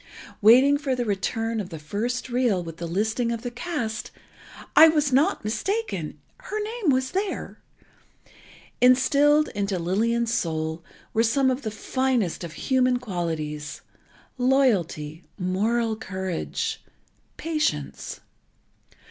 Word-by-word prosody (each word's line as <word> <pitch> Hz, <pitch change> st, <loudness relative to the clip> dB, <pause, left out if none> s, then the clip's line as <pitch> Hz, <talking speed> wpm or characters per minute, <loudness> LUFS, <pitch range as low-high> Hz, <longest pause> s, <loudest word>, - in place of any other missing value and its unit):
Waiting 260 Hz, +7 st, +6 dB
for 275 Hz, -3 st, -1 dB
the 245 Hz, -1 st, -2 dB
return 225 Hz, +2 st, -1 dB
of 195 Hz, -4 st, -4 dB
the 165 Hz, -, -7 dB
first 215 Hz, +13 st, -3 dB
reel, 240 Hz, -7 st, +1 dB
with 165 Hz, -1 st, -8 dB
the 170 Hz, -, -4 dB
listing 220 Hz, +7 st, 0 dB
of 230 Hz, 0 st, -4 dB
the 245 Hz, -, -4 dB
cast, 240 Hz, -4 st, -4 dB, 0.7 s
I 320 Hz, -, +10 dB
was 300 Hz, -4 st, +2 dB
not 295 Hz, -, +3 dB
mistaken—her 215 Hz, -, -4 dB
name 430 Hz, -3 st, -2 dB
was 260 Hz, -1 st, +2 dB
there. 390 Hz, +1 st, -3 dB, 1.2 s
Instilled 285 Hz, +4 st, +5 dB
into 200 Hz, -1 st, -2 dB
Lillian's 225 Hz, +7 st, 0 dB
soul 160 Hz, -4 st, -2 dB, 0.3 s
were 220 Hz, -, +3 dB
some 260 Hz, +4 st, +3 dB
of 255 Hz, +2 st, -2 dB
the 225 Hz, -, -3 dB
finest 235 Hz, -3 st, -1 dB
of 165 Hz, -2 st, -6 dB
human 255 Hz, +4 st, +2 dB
qualities: 160 Hz, -9 st, -4 dB, 0.6 s
loyalty, 190 Hz, -, +1 dB
moral 220 Hz, +5 st, 0 dB
courage, 190 Hz, -4 st, -3 dB, 0.6 s
patience. 300 Hz, -, -2 dB
230 Hz, 115 wpm, -25 LUFS, 185-260 Hz, 1.2 s, I